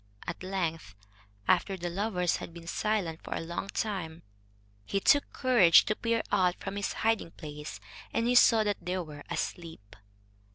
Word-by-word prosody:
At - - -5
length, 170 - -3 0.5
after 190 +2 +2
the 175 -1 -4
lovers 180 -2 0
had 165 - -9
been 170 -1 -10
silent 175 -3 -1
for - - -4
a - - -2
long 170 +3 -4
time, 185 -6 -3 0.6
he 200 - -1
took 285 +8 +3
courage 235 - +6
to 215 - 0
peer 230 0 0
out 185 -3 +3
from 195 0 -5
his 200 -1 -2
hiding 225 -6 +2
place, 150 -2 -8 0.3
and 230 - 0
he 245 - +2
saw 230 -2 +6
that 205 -1 -2
they 180 +1 -2
were 155 -5 -6
asleep. 160 - -5
185 Hz, 165 wpm, -30 LUFS, 165-215 Hz, 0.6 s, courage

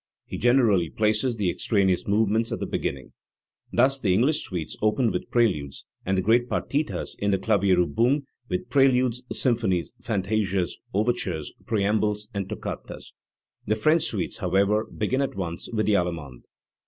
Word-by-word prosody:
He - - -6
generally 115 -8 +3
places 110 - +1
the 95 -4 +1
extraneous 95 -2 +1
movements 110 +2 +1
at - - -2
the - - -2
beginning. 65 -1 -4 0.6
Thus 135 +3 +3
the 95 -7 +2
English 145 +9 +2
suites 85 -5 -5
open 110 +2 +2
with - - -4
preludes, 90 - 0 0.2
and 95 0 +1
the 95 - +1
great 120 +4 +3
partitas 150 +2 -2
in 100 - 0
the 100 - +3
Klavierilbung 100 - +2 0.3
with 90 +7 -3
preludes, 125 -2 +3
symphonies, 110 -9 +1
fantasias,, 100 -4 0 0.2
overtures, 100 -7 -1
preambles 105 0 0
and 100 -2 -3
toccatas; - - -7 0.5
the 110 - +2
French 155 +10 +3
suites, 100 -5 -2
however, 100 +4 +2
begin 125 +5 -1
at 135 - -2
once 85 -3 -4
with 110 -2 0
the 105 - +2
allemande. 85 -9 -2
105 Hz, 145 wpm, -25 LUFS, 95-120 Hz, 0.6 s, generally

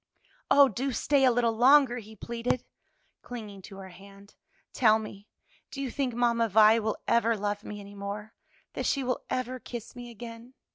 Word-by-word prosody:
"Oh, 280 -1 +7
do 265 +4 -3
stay 280 +1 +2
a 255 - +5
little 235 -1 +1
longer!" 255 +1 +5
he 220 0 -13
pleaded, 235 +3 -3 0.6
clinging 215 -5 -8
to 195 +1 -12
her 190 -1 -9
hand. 200 +2 -16 0.4
"Tell 220 -3 +4
me, 215 -2 -9 0.4
do 275 - -8
you 270 -3 -3
think 260 -3 -2
Mamma 235 -1 +2
Vi 215 +2 +6
will 220 -1 -2
ever 230 -1 +2
love 205 0 -3
me 210 - -7
any 200 0 -11
more? 205 +2 -6 0.4
that - - -2
she 275 - 0
will 250 -1 -2
ever 255 0 -3
kiss 235 -1 -8
me 245 -1 -9
again?" 235 +2 -11
230 Hz, 180 wpm, -28 LUFS, 210-245 Hz, 0.6 s, Oh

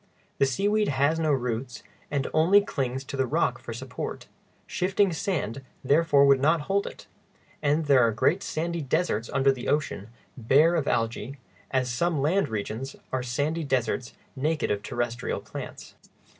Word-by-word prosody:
The 135 - +4
seaweed 205 +9 +1
has 145 +4 +1
no 155 -2 +1
roots, 125 -2 -2 0.3
and 140 -2 -1
only 170 +6 +6
clings 130 -8 -3
to 140 - -7
the 135 -1 0
rock - - 0
for - - -8
support; - - -6 0.4
shifting 190 0 +1
sand 150 - -2 0.2
therefore 145 0 +4
would 140 -1 +5
not 155 +4 +3
hold 195 +6 0
it, - - -10 0.6
and 150 +2 +1
there 140 -3 +5
are 115 -2 +4
great 150 - +1
sandy 170 0 -3
deserts 130 -5 -1
under 135 0 +3
the 130 -2 -5
ocean, 145 -9 -1 0.3
bare 140 +7 +4
of 160 -5 0
algæ, 115 +1 -1 0.3
as 130 -2 0
some 165 +5 0
land 170 +8 +1
regions 110 +5 -4 0.2
are 130 - -1
sandy 145 +7 -1
deserts 125 -3 -1 0.2
naked 150 +3 0
of 100 -1 -1
terrestrial 120 +1 -3
plants. - - -9
140 Hz, 155 wpm, -26 LUFS, 125-165 Hz, 0.6 s, only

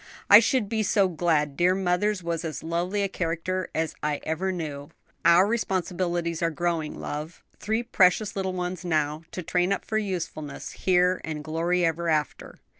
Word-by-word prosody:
"I - - +12
should 255 -7 +1
be 220 +1 -1
so 200 -1 +3
glad, 160 -4 0
dear 180 +4 +3
mother's 190 +1 0
was 170 -1 -2
as 160 -2 -5
lovely 175 +5 -1
a - - +1
character 185 0 -2
as 160 -1 -1
I 150 -1 -1
ever 175 +5 -1
knew." 150 -5 -5 0.3
"Our 170 +3 +6
responsibilities 175 -5 -1
are 165 - +2
growing, 165 -1 -2
love: 150 +4 -6 0.2
three 220 +3 -1
precious 195 -3 +3
little 190 -1 -2
ones 180 0 -4
now 155 -3 0
to 180 - -6
train 180 +3 +1
up 200 - -1
for 215 - 0
usefulness 170 -7 -5
here 180 0 +2
and 155 -2 -5
glory 165 +3 0
hereafter." 165 -2 -1
175 Hz, 165 wpm, -26 LUFS, 160-185 Hz, 0.3 s, I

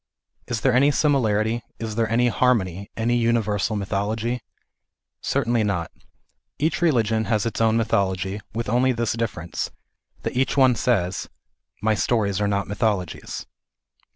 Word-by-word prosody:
Is 115 - -2
there 130 - +3
any 140 +3 +5
simi 145 -1 +3
larity, 110 0 +1 0.2
is 110 -1 -4
there 115 0 0
any 120 +2 +3
harmony, 100 -7 +1
any 115 +2 +1
universal 115 -2 +1
mythology? 105 +4 -1 0.8
Cer 140 -2 0
tainly 115 -1 +2
not. 95 -5 -1 0.7
Each 155 +4 0
religion 115 -9 +2
has 110 -2 +1
its 115 - -2
own 110 0 +4
mythology, 95 -3 0
with 115 +2 -3
only 125 +4 +3
this 115 -1 -1
difference, 100 -7 -3 0.5
that - - -3
each 135 +3 +1
one 130 -2 +6
says 100 -5 0 0.3
" - - -42
My 110 0 +3
stories 105 -2 +1
are 105 - +2
not 100 -1 0
mythologies." 100 -4 -2
110 Hz, 150 wpm, -23 LUFS, 100-120 Hz, 0.8 s, one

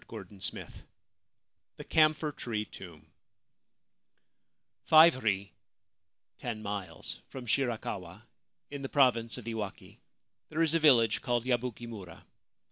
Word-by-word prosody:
351 100 -2 -7
LVII - - -15 1.1
THE - - -7
CAMPHOR 155 -1 +3
TREE 110 -6 -3
TOMB 85 -7 -12 1.8
FIVE 155 -4 +7
ri 100 -2 0 0.9
(ten 110 -3 -5
miles) 100 -5 -6
from 130 -2 -8
Shirakawa, 110 -7 -2 0.5
in 145 -1 -5
the 135 - -4
province 120 -4 +3
of 125 - -9
Iwaki, 110 -4 -6 0.5
there 160 +2 +1
is 160 -1 +2
a 165 - +3
village 120 -8 +5
called 120 -3 0
Yabuki 120 -2 -1
mura. 95 -8 -10
115 Hz, 115 wpm, -31 LUFS, 105-135 Hz, 1.8 s, FIVE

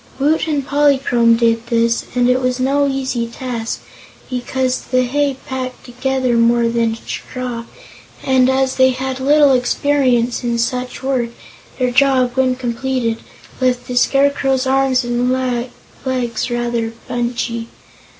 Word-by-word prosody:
Woot 300 +4 +1
and 290 -3 -1
Polychrome 270 -5 +3
did 230 0 +1
this 235 -1 +1
and 245 -1 +3
it 250 +1 +2
was 255 0 0
no 280 +2 +2
easy 260 -3 -2
task 235 -1 -5 0.5
because 255 +1 -1
the 255 0 +1
hay 280 +2 0
packed 260 -2 -5
together 255 0 -1
more 235 0 +3
than 230 -1 0
straw 245 -2 -5 0.6
and 260 -1 +3
as 265 0 +1
they 260 0 +5
had 260 +1 -3
little 285 +1 +5
experience 250 -2 +1
in 235 -1 0
such 250 +2 -2
work 260 -3 0 0.5
their 250 -1 0
job, 255 -1 +3
when 260 -1 +2
completed, 245 -1 -2 0.4
left 250 -1 0
the 250 - -4
Scarecrow's 275 0 +2
arms 265 -1 +2
and 240 +1 0
legs 250 -1 -3
rather 240 -1 -2
bunchy. 240 -1 -2
255 Hz, 130 wpm, -18 LUFS, 240-265 Hz, 0.6 s, they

